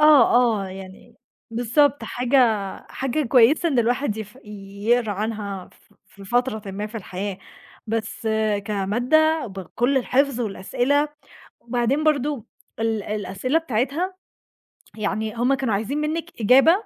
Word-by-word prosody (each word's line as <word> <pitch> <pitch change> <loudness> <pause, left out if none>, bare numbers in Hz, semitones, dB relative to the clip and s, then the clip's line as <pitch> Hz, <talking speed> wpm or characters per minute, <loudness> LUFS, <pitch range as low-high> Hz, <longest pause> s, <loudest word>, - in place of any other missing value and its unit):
آه، 300 -7 +7 0.3
آه. - - -6
يعني 190 0 -11 0.4
بالضبط 250 +5 +2
حاجة 250 +2 0 0.5
حاجة 270 +3 -1
كويسة 260 +7 +5
إن 270 -6 +1
الواحد 240 0 +1
يف 220 +3 -8
يقرا 210 +2 -1
عنها 205 -2 -4
ف - - -27
في 200 -1 -14
فترةٍ 220 -2 -1
ما 205 +2 -4
في 215 - -14
الحياة. 195 -1 -5 0.5
بس 225 0 -3 0.4
كمادة 245 +11 +2
بكل 210 +7 -2
الحفظ 265 0 +1
والأسئلة، 245 +8 0 0.5
وبعدين 245 +5 0
برضه 290 -5 +1 0.3
ال 225 -2 0
الأسئلة 210 +8 -1
بتاعتها 295 - -1 0.8
يعني 215 +1 -2
هم 245 +3 +2
كانوا 265 -5 0
عايزين 220 +8 -1
منِّك 320 +3 -2
إجابة 260 +8 +6
235 Hz, 120 wpm, -23 LUFS, 210-275 Hz, 0.8 s, آه